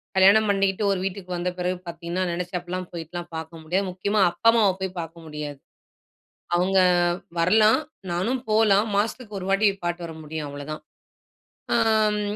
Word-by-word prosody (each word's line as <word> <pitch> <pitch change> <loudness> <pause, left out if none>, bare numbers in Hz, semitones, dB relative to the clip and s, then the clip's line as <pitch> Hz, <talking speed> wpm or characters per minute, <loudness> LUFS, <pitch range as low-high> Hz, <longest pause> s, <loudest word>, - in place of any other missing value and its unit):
கல்யாணம் 200 +3 +6
பண்ணிகிட்டு 195 0 +1
ஒரு 190 - 0
வீட்டுக்கு 195 -1 -5
வந்த 175 +1 -1
பிறகு 180 +1 -1
பார்த்தீங்கன்னா, 170 +2 -3
நெனைச்சப்பல்லாம் 180 +1 -4
போய்ட்டுல்லாம் 175 +1 -6
பார்க்க 160 0 -7
முடியாது. 185 +5 0
முக்கியமா 200 +4 -1
அப்பா 175 +6 +2
அம்மாவ 225 -3 +4
போய் 190 -1 -3
பார்க்க 165 0 -7
முடியாது. 150 -2 -6 1.0
அவுங்க 190 +2 +2 0.6
வரலாம், 215 - +5 0.3
நானும் 190 +10 0
போலாம். 215 -1 +4
மாசத்துக்கு 215 0 -2
1 185 - -6
வாட்டி 195 +2 +3 0.2
பாத்துட்டு 175 0 -2
வர 165 - -8
முடியும் 155 0 -5
அவ்ளோ 145 0 -8
தான். 155 - -7 0.9
ஆம் 215 -1 +3
185 Hz, 145 wpm, -24 LUFS, 170-205 Hz, 1.0 s, கல்யாணம்